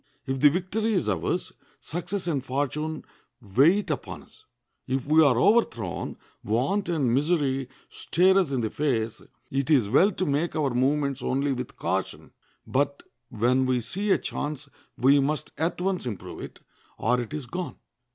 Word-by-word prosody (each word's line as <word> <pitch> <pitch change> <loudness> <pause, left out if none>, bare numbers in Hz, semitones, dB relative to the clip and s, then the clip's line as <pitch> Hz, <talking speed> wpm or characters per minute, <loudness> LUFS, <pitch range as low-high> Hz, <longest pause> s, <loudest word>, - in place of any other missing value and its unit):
If 135 -1 -2
the 145 - +7
victory 195 +7 -1
is 185 - 0
ours, 95 -6 -1 0.3
success 175 +4 -4
and 145 -7 -1
fortune 145 +4 -2 0.3
wait 155 - +3
upon 150 - -5
us; - - -23 0.4
if 130 0 -1
we 155 +2 +5
are 130 -5 +4
overthrown, 125 - +1 0.3
want 135 - 0
and 140 -8 +1
misery 135 -3 +1 0.2
stare 185 +3 +2
us 175 -7 0
in 130 -3 0
the 110 - -2
face; 115 -7 -1 0.3
it 135 +2 -1
is 130 -10 +4
well 180 - +5
to 185 - -2
make 145 +5 0
our 145 -4 +1
movements 140 +1 +1
only 135 +3 0
with 125 -1 -5
caution, 95 +3 -3 0.3
but 140 +1 0 0.3
when 125 +4 +2
we 130 -1 +2
see 195 - -3
a - - +5
chance 145 0 -4 0.3
we 140 +3 +5
must 150 +2 -1
at 165 +2 -1
once 185 -6 -1
improve 105 -7 -6
it, - - -9 0.4
or 125 +2 +1
it 120 - -7
is 150 -3 -4
gone. 180 +8 -5
140 Hz, 160 wpm, -26 LUFS, 125-165 Hz, 0.4 s, the